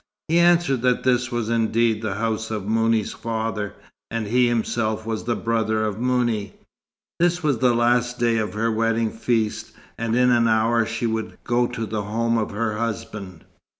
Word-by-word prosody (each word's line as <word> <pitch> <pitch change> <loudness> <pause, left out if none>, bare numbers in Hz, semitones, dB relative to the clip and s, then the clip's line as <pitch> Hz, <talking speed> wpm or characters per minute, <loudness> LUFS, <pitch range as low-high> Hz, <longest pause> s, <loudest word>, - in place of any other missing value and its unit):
He 165 +2 +4
answered 170 -7 +3
that 125 -1 +1
this 125 0 +1
was 120 -2 -2
indeed 115 -1 +1
the 105 -4 -2
house 110 +1 -2
of 105 -3 -4
Mouni's 115 -1 +1
father, 110 -2 -3 0.3
and 115 -1 -2
he 125 +4 +3
himself 110 -2 -1
was 110 -1 -3
the 120 0 0
brother 110 -1 0
of 105 0 -3
Mouni. 120 -5 0 0.7
This 175 0 +2
was 145 -6 +1
the 125 -1 +3
last 120 +1 +2
day 115 -1 +2
of 105 -3 -3
her 115 +1 +1
wedding 115 0 +1
feast, 115 -2 -1 0.3
and 115 0 0
in 125 0 +4
an 120 -1 +4
hour 115 +1 +2
she 115 +1 -3
would 110 -1 -3
go 120 0 +1
to 120 -2 -4
the 110 -1 -3
home 115 +3 0
of 110 - -2
her 105 0 -2
husband. 100 -5 -5
115 Hz, 180 wpm, -23 LUFS, 110-120 Hz, 0.7 s, He